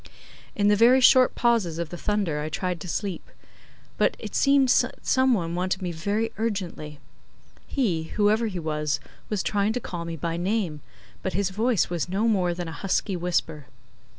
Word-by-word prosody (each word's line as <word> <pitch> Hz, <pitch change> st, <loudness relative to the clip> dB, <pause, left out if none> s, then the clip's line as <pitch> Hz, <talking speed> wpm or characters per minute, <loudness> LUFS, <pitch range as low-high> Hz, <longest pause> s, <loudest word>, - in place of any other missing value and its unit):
In 205 Hz, -1 st, +2 dB
the 205 Hz, -, +5 dB
very 240 Hz, +5 st, +6 dB
short 255 Hz, 0 st, +6 dB
pauses 225 Hz, -9 st, +1 dB
of 170 Hz, -2 st, -3 dB
the 175 Hz, -, -7 dB
thunder 190 Hz, -5 st, -1 dB
I 150 Hz, +1 st, -3 dB
tried 180 Hz, +2 st, -3 dB
to -, -, -7 dB
sleep, 185 Hz, +1 st, -4 dB, 0.7 s
but -, -, +3 dB
it -, -, -8 dB
seemed 275 Hz, -1 st, +4 dB
that -, -, +1 dB
some 260 Hz, -1 st, +3 dB
one 170 Hz, -4 st, -3 dB
wanted 185 Hz, +2 st, -1 dB
me 175 Hz, -, -2 dB
very 205 Hz, +7 st, -2 dB
urgently. 185 Hz, -9 st, -3 dB, 0.7 s
He, 185 Hz, -, 0 dB
whoever 215 Hz, +2 st, +3 dB
he 190 Hz, -4 st, -5 dB
was, 150 Hz, -2 st, -1 dB, 0.3 s
was 205 Hz, -3 st, -1 dB
trying 205 Hz, +1 st, +1 dB
to 250 Hz, -, -1 dB
call 175 Hz, -7 st, -6 dB
me 165 Hz, 0 st, -5 dB
by 165 Hz, +2 st, -3 dB
name, 180 Hz, -4 st, -1 dB, 0.4 s
but 190 Hz, -, -3 dB
his 195 Hz, +2 st, 0 dB
voice 220 Hz, -1 st, +1 dB
was 175 Hz, 0 st, -2 dB
no 200 Hz, +5 st, 0 dB
more 180 Hz, -6 st, +1 dB
than 175 Hz, -1 st, -5 dB
a -, -, -5 dB
husky 195 Hz, 0 st, 0 dB
whisper. 165 Hz, -5 st, -2 dB
185 Hz, 180 wpm, -25 LUFS, 170-220 Hz, 0.7 s, very